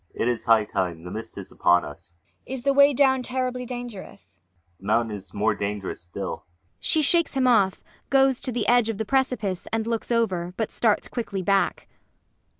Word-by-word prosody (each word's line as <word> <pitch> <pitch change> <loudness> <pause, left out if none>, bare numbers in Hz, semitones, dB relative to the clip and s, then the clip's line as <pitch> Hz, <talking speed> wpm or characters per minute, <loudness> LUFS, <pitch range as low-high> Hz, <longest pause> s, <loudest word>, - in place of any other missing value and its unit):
] - - -37
It - - +2
is 120 -2 -1
high 110 -2 +5
time! 90 -5 -3
The 90 - -8
mist 110 +1 -7
is - - -7
upon 90 0 +3
us! 75 +3 -12 0.3
MAIA. - - -5
Is 245 - -7
the 275 0 +3
way 280 +1 +6
down 265 -1 +3
terribly 250 0 -3
dangerous? 190 - -9
ULFHEIM. 85 -1 -43
The 95 - -15
mountain 110 0 +1
is 100 -1 -8
more 105 +2 +1
dangerous 100 -2 -4
still. 90 +3 -6 0.3
[She 315 -2 +2
shakes 335 0 +2
him 265 -1 +2
off, 200 -6 +3 0.3
goes 270 -2 +3
to 255 - -2
the 235 -3 -1
edge 240 -1 +4
of 220 - -2
the 220 - -2
precipice 250 -7 -1
and 225 -1 -1
looks 230 +1 -3
over, 185 -7 0
but 220 - -2
starts 220 -3 +1
quickly 200 -5 -4
back. 195 +1 +1
205 Hz, 200 wpm, -25 LUFS, -, 0.3 s, way